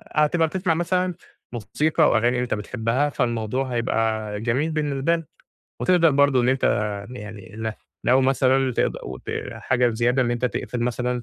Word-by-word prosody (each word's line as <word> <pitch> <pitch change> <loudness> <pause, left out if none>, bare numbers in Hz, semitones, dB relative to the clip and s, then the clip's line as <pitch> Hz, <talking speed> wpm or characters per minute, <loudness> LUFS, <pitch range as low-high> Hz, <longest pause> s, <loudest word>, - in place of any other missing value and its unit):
هتبقى 160 +2 +3
بتسمع 180 +1 0
مثلًا 180 +2 0 0.4
موسيقى 150 +7 +1
وأغاني 120 +2 +2
أنت 125 0 -1
بتحبها 115 +6 -1
فالموضوع 120 0 -1
هيبقى 110 -3 -1
جميل 130 +8 0
بالنسبة 150 +1 0
لك، 165 -2 -7 0.5
وتقدر 175 -3 +4
برضه 140 -2 +4
إن 120 - +1
أنت 130 0 +1 0.5
يعني 105 -5 -9
ل 110 0 -3 0.3
لو 130 +2 +4
مثلًا 135 0 +2
تقد - - +1
وت 65 -1 -8 0.3
حاجة 125 -1 +1
زيادة 120 +3 +1
إن 120 - 0
أنت 120 +1 -1
تقفل 125 0 -2
مثلًا 125 0 -1
125 Hz, 150 wpm, -23 LUFS, 115-145 Hz, 0.5 s, وتقدر